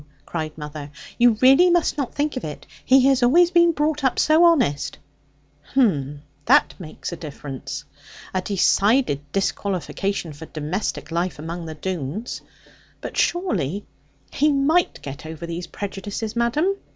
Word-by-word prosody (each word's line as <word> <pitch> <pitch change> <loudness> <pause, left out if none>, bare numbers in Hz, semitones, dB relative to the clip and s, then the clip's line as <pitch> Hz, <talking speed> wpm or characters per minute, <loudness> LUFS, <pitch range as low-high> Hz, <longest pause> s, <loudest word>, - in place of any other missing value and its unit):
cried 155 -2 -5
mother: 150 -1 -7 0.3
'you 240 -2 +5
really 270 +8 +7
must 345 -1 +2
not 280 -5 -2
think 290 0 -1
of 255 - -4
it. 150 - -7 0.2
He 260 0 +5
has 270 -1 +4
always 340 +8 +5
been 345 -1 +5
brought 300 -1 -1
up 265 - +1
so 315 +3 +5
honest 250 - +2 0.4
' 145 +1 -28
'Hem! 145 - +1 0.2
that - - +4
makes 160 -1 -7
a - - -4
difference. 145 -3 -7 0.5
A 185 - 0
decided 200 - +2
disqualification 195 -2 -2
for 155 +3 -10
domestic 155 +1 -4
life 170 +2 -1
among 165 +2 -6
the 160 - -6
Doones. 185 - -4 0.6
But, - - -7
surely, 205 - 0 0.5
he 300 +1 +3
might 295 +5 +1
get 140 +2 -7
over 160 +1 -7
those 170 +1 -5
prejudices, 205 +3 -5
madam?' 295 +12 +1
195 Hz, 145 wpm, -22 LUFS, -, 0.6 s, really